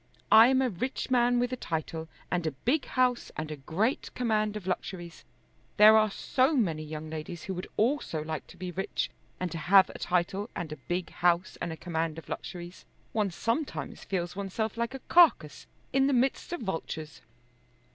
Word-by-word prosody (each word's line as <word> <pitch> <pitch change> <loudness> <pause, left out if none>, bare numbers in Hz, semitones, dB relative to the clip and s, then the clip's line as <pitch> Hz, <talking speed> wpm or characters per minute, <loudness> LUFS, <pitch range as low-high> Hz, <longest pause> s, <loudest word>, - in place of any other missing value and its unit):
I 220 +2 +9
am 265 0 +3
a 255 - +1
rich 255 +8 -3
man 245 -1 +4
with 245 +1 0
a - - +1
title, 160 -5 -4 0.2
and 175 -2 0
a - - 0
big 275 +5 +2
house, 250 -2 +1
and 155 0 -4
a - - -3
great 180 - -1
command 215 -3 0
of 200 - -9
luxuries. 180 -2 -4 0.5
There 215 +1 +9
are 215 0 +5
so 260 +8 +1
many 170 - +1
young 155 0 -6
ladies 160 +2 -6
who 190 - -4
would 180 0 -5
also 220 - +1
like 155 -1 -5
to - - -14
be 180 0 -5
rich, 190 +2 -2 0.3
and 180 -2 -2
to 165 - -4
have 190 +3 +5
a - - -10
title, 180 +4 0
and 160 -3 -4
a 155 - -5
big 175 0 -2
house, 175 +1 +1
and 170 - -2
a 160 - -6
command 165 -2 -2
of 165 - -10
luxuries! 175 0 -7 0.3
One 210 -2 +1
sometimes 230 - -3
feels 175 -2 -3
oneself 200 +3 -3
like 235 +2 -2
a 270 - -7
carcase 310 - +4 0.3
in 270 0 +4
the 280 - +2
midst 260 +6 0
of 350 - -3
vultures." 160 -6 -5
190 Hz, 190 wpm, -29 LUFS, 165-240 Hz, 0.5 s, I